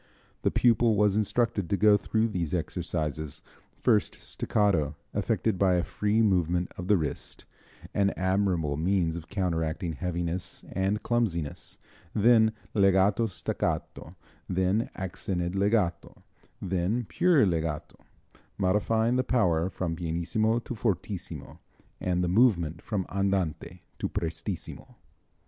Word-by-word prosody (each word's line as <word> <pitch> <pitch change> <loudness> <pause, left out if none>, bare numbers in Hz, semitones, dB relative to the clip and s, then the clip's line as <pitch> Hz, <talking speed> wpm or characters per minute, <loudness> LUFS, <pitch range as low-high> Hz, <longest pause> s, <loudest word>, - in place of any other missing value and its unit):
The - - +2
pupil 115 -2 +3
was 105 -1 +3
instructed 110 -2 0
to 100 - +1
go 105 0 +6
through 110 +2 0
these 90 -5 -2
exercises 80 -4 -3 0.4
first 110 -4 +3
staccato, 85 -8 0 0.2
effected 105 -5 0
by 95 -2 +4
a 90 - +1
free 105 +5 +1
movement 90 -3 +1
of 90 - -6
the 105 0 +5
wrist, 75 -4 -4 0.5
an 100 -1 +2
admirable 95 -6 +1
means 85 0 +1
of 85 -1 -7
counteracting 85 -3 -1
heaviness 85 +1 -3
and 95 +3 -1
clumsiness, 95 -11 -1 0.4
then 110 0 +5 0.2
legato 100 +2 +3
staccato, 90 -3 -3 0.3
then 95 +4 +1
accented 90 -1 -3
legato, 100 -4 0 0.4
then 95 +6 -1
pure 170 -9 +4
legato, 80 -4 -2 0.6
modifying 110 +5 +2
the 130 - +2
power 90 -10 +2
from 85 -3 -3
pp 90 +8 0
to - - -5
ff, 95 -4 -3 0.4
and 90 -1 0
the - - +1
movement 85 -6 +3
from 100 -5 -2
andante 95 -3 -1 0.2
to - - -2
prestissimo. 85 -1 -5
95 Hz, 120 wpm, -28 LUFS, 85-105 Hz, 0.6 s, go